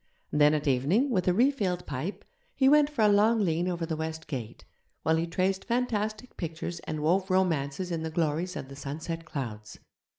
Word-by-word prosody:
Then 150 0 +5
at 150 0 -2
evening, 155 - +2
with 185 -6 +1
a - - +6
refilled 200 -5 +1
pipe, 150 +9 -5 0.3
he 265 - +4
went 295 +1 +6
for 280 -7 0
a - - +6
long 210 +3 +4
lean 170 +1 0
over 175 -2 -1
the 160 -1 -2
west 160 0 -4
gate, 120 -6 -6 0.4
while 160 - +3
he 165 +1 0
traced 190 +3 0
fantastic 230 -1 -2
pictures 170 0 -4
and 155 -1 -3
wove 185 +5 +2
romances 180 -2 0
in 165 -1 -2
the 160 - -3
glories 165 +3 -1
of 130 - -5
the 135 - -10
sunset 160 +4 -5
clouds. 110 -8 -6
170 Hz, 190 wpm, -28 LUFS, 155-200 Hz, 0.4 s, a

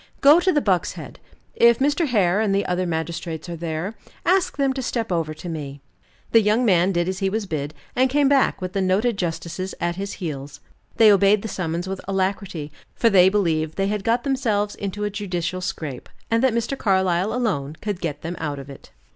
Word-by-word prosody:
"Go 290 +4 +7
to 370 +1 +2
the 295 - +2
Buck's 185 -7 +1
Head. - - -10 0.3
If 235 0 +5
Mr. 290 +4 +1
Hare 205 -5 +2
and 200 -3 +1
the 200 - +1
other 180 0 -1
magistrates 160 0 -4
are 170 - -4
there, 165 +4 -4 0.3
ask 375 -1 +2
them 275 -2 +2
to 265 - -3
step 230 -4 -2
over 160 -3 -1
to 160 - -9
me." 145 -4 -6 0.5
The 225 - +6
young 215 +4 +2
man 185 -2 +4
did 175 -1 0
as 185 0 -2
he 195 -1 +1
was 215 +1 -2
bid, 150 -4 -4 0.2
and 260 +1 +3
came 285 +1 +3
back 270 -6 +2
with 185 0 -4
the 195 - 0
noted 200 +5 +1
justices 180 +1 -4
at 175 0 -1
his 200 +1 -4
heels. 145 -5 -6 0.4
They 220 -2 +7
obeyed 200 +1 +4
the - - -3
summons 175 -2 -3
with 190 0 -4
alacrity, 190 -5 -2 0.2
for 230 - +3
they 185 -1 +7
believed 160 -6 0
they 195 0 0
had 210 -1 -2
got 235 +2 +1
themselves 220 -7 0
into 205 +1 -5
a 205 - -1
judicial 185 -3 -3
scrape, 150 -7 -5 0.2
and 230 0 +3
that 260 -3 +3
Mr. 235 +4 -1
Carlyle 190 -4 +1
alone 180 - -1
could 205 -4 -4
get 150 -4 -4
them 170 +2 -4
out 145 -3 -3
of 140 0 -9
it. 135 - -13
195 Hz, 210 wpm, -23 LUFS, 170-220 Hz, 0.5 s, Go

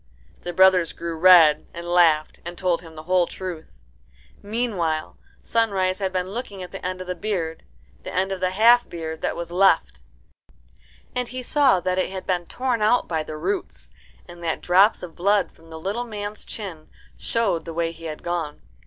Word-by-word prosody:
The 175 - -4
brothers 185 -1 +4
grew 170 -1 -5
red, 160 -3 +6
and 170 0 -7
laughed, 165 -3 +3
and 175 +1 -7
told 180 -3 0
him 165 -2 -13
the 155 - -9
whole 180 0 +2
truth. 180 -4 -7 0.7
Meanwhile 200 -8 -2 0.3
Sunrise 195 -5 +1
had 190 -2 -1
been 185 0 -2
looking 205 -4 -6
at 180 - -9
the - - -8
end 185 0 -3
of - - -6
the 180 - -3
beard, 170 -3 -3 0.4
the - - -7
end 190 +1 0
of 190 - -3
the 185 0 +1
half 230 +6 +5
beard 160 -2 -6
that - - -1
was 170 0 -6
left, 170 - +3 1.1
and 250 -1 -2
he 255 +1 -6
saw 270 -6 +3
that 185 +1 0
it - - 0
had 190 -1 -6
been 175 -2 -1
torn 250 -3 -1
out 220 +4 +3
by 160 -2 -1
the 155 0 -7
roots, 185 +6 -4 0.4
and 175 -1 -12
that 165 - -2
drops 190 +4 +4
of 170 -3 -8
blood 200 +3 +2
from 165 0 -20
the 160 - -8
little 205 +8 -3
man's 210 -2 -6
chin 180 -8 -7 0.3
showed 220 -8 -1
the 165 - -6
way 165 0 0
he 165 0 -12
had 155 -1 -6
gone. 170 -4 -3
180 Hz, 190 wpm, -23 LUFS, 165-200 Hz, 1.1 s, red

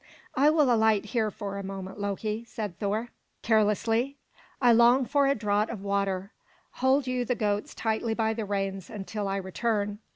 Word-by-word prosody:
"I 280 +3 +4
will 300 -5 +4
alight 220 -2 +3
here 220 0 0
for 200 -1 -5
a - - -5
moment, 195 0 -7
Loki," 210 +2 -2
said 210 -6 -6
Thor 215 +4 -1 0.3
carelessly. 225 +4 +2 0.4
"I 245 -2 +5
long 240 +3 +5
for 280 +1 +2
a 275 - +3
draught 210 -1 0
of 210 -4 -6
water. 200 -1 -1 0.5
Hold 265 +1 +3
you 255 -1 -1
the 250 +1 -1
goats 205 -2 -1
tightly 220 0 -1
by 220 -1 +1
the 220 0 -3
reins 195 -2 -3
until 210 0 -4
I 195 - -1
return." 205 +2 -2
215 Hz, 170 wpm, -28 LUFS, 200-235 Hz, 0.5 s, I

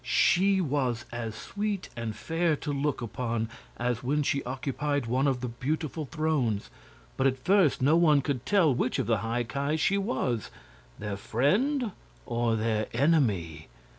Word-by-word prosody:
She 195 +2 +3
was 130 -7 -1
as 115 -2 -4
sweet 205 - -3
and 115 -3 -4
fair 165 -1 0
to 145 0 -4
look 140 -2 -1
upon 115 -1 -2 0.3
as 120 -1 -1
when 145 +4 +1
she 140 0 0
occupied 140 +2 -2
one 130 +5 +1
of 130 -3 0
the 125 - -2
beautiful 150 +6 -3
thrones, 145 -9 -1 0.5
but 135 - +3
at 130 -1 +1
first 180 -2 +3
no 150 +4 +5
one 155 -4 +5
could 135 -3 -2
tell 185 -9 +4
which 125 - 0
of - - 0
the 115 -2 +2
High 115 +3 -1
Ki 140 +5 -1
she 195 +6 +2
was 130 - -1 0.5
their 105 -1 -4
friend 210 - +1 0.3
or 120 -1 0
their 110 -1 0
enemy. 110 - +1
135 Hz, 160 wpm, -28 LUFS, 115-155 Hz, 0.5 s, no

